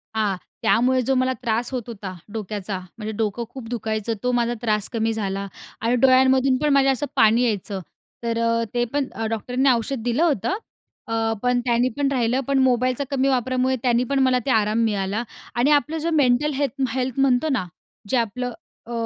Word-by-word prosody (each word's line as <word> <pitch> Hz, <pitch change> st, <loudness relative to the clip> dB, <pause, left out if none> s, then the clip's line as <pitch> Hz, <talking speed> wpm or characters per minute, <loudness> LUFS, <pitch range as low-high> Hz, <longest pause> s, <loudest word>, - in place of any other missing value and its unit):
हां. 210 Hz, -3 st, +1 dB, 0.3 s
त्यामुळे 255 Hz, +3 st, +3 dB
जो 270 Hz, -, +3 dB
मला 255 Hz, 0 st, +2 dB
त्रास 230 Hz, +2 st, 0 dB
होत 255 Hz, -2 st, -3 dB
होता, 200 Hz, -5 st, -7 dB, 0.2 s
डोक्याचा, 205 Hz, -3 st, -4 dB, 0.2 s
म्हणजे 215 Hz, 0 st, -4 dB
डोकं 220 Hz, +1 st, -1 dB
खूप 255 Hz, -4 st, -9 dB
दुखायचं 220 Hz, -2 st, -2 dB
तो 250 Hz, -, +1 dB
माझा 240 Hz, -1 st, +1 dB
त्रास 215 Hz, -3 st, 0 dB
कमी 225 Hz, 0 st, 0 dB
झाला 200 Hz, -2 st, -3 dB, 0.3 s
आणि 230 Hz, +2 st, +2 dB
डोळ्यांमधून 260 Hz, +1 st, +4 dB
पण 300 Hz, -, +2 dB
माझ्या 270 Hz, -1 st, +4 dB
असं 270 Hz, +3 st, -1 dB
पाणी 225 Hz, +3 st, +5 dB
यायचं 205 Hz, -3 st, -1 dB, 0.4 s
तर 230 Hz, 0 st, -1 dB
अ, 230 Hz, 0 st, +1 dB
ते 240 Hz, 0 st, +1 dB
पण 285 Hz, -2 st, 0 dB
अ, 225 Hz, -, -4 dB
डॉक्टरनी 250 Hz, +4 st, 0 dB
औषध 235 Hz, 0 st, -1 dB
दिलं 245 Hz, +7 st, +1 dB
होतं 290 Hz, -, +1 dB, 0.5 s
अ, 225 Hz, 0 st, 0 dB
पण 250 Hz, 0 st, +2 dB
त्यानी 240 Hz, +1 st, +2 dB
पण 285 Hz, -, +1 dB
राहिलं. 245 Hz, -1 st, +1 dB
पण 275 Hz, -, +2 dB
मोबाईलचा 255 Hz, +1 st, +2 dB
कमी 270 Hz, 0 st, +1 dB
वापरामुळे 255 Hz, 0 st, +1 dB
त्यानी 245 Hz, -1 st, +3 dB
पण 275 Hz, +2 st, 0 dB
मला 260 Hz, -1 st, +3 dB
ते 270 Hz, -, +1 dB
आराम 215 Hz, 0 st, +2 dB
मिळाला 205 Hz, +1 st, -1 dB, 0.3 s
आणि 250 Hz, +5 st, +3 dB
आपलं 300 Hz, +2 st, +2 dB
जो 325 Hz, +2 st, -1 dB
मेंटल 285 Hz, 0 st, +3 dB
हेल्थ 275 Hz, -1 st, -2 dB
हेल्थ 260 Hz, 0 st, -2 dB
म्हणतो 270 Hz, +3 st, +3 dB
ना, 255 Hz, -9 st, 0 dB, 0.4 s
जे 255 Hz, -, +2 dB
आपलं 240 Hz, +2 st, -2 dB, 0.3 s
अ, 240 Hz, -, -10 dB
245 Hz, 185 wpm, -23 LUFS, 225-260 Hz, 0.5 s, पाणी